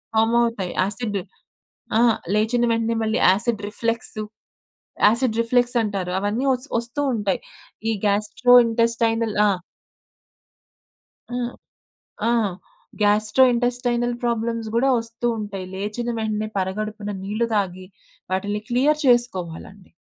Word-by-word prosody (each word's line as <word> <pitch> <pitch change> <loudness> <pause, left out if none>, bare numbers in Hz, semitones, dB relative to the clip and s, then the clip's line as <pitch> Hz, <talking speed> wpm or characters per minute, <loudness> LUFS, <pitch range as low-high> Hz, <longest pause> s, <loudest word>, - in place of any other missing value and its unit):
Form 225 +1 +3
అవుతాయి. 230 -6 -1
Acid. 205 +2 -2 0.8
ఆ! - - +4 0.3
లేచిన 230 +3 +2
వెంటనే 230 0 0
మళ్ళీ 220 +1 0
యాసిడ్ 210 +3 +2
రిఫ్లెక్స్, 230 +1 -2 0.9
యాసిడ్ 230 +1 +2
రిఫ్లెక్సంటారు 230 -6 +1
అవన్నీ 210 +7 -1
వస్ 255 +3 -5
ఒస్తూ 235 +5 -4
ఉంటాయి. 205 -4 0 0.5
ఈ - - +2
గ్యాస్ట్రో 210 +4 +2
ఇంటెస్టైనల్ 230 -1 +1
ఆ! - - +4 1.8
హ్మ్. 245 0 -2 0.8
ఆ! - - +3 0.7
గ్యాస్ట్రో 215 +5 +4
ఇంటెస్టైనల్ 245 0 0
ప్రాబ్లమ్స్ 230 -1 -1
గూడా 260 +4 +3
ఒస్తూ 230 +1 -4
ఉంటయి. 200 -3 -5
లేచిన 210 +5 -3
వెంటనే 215 -1 -2
పరగడుపున 210 +2 -3
నీళ్లు 215 +4 -1
దాగి, 185 -2 -1 0.5
వాటిలని 205 +2 -1
క్లియర్ 285 +5 +2
చేసుకోవాలండి. 195 -6 0
225 Hz, 105 wpm, -22 LUFS, 205-240 Hz, 1.8 s, ఆ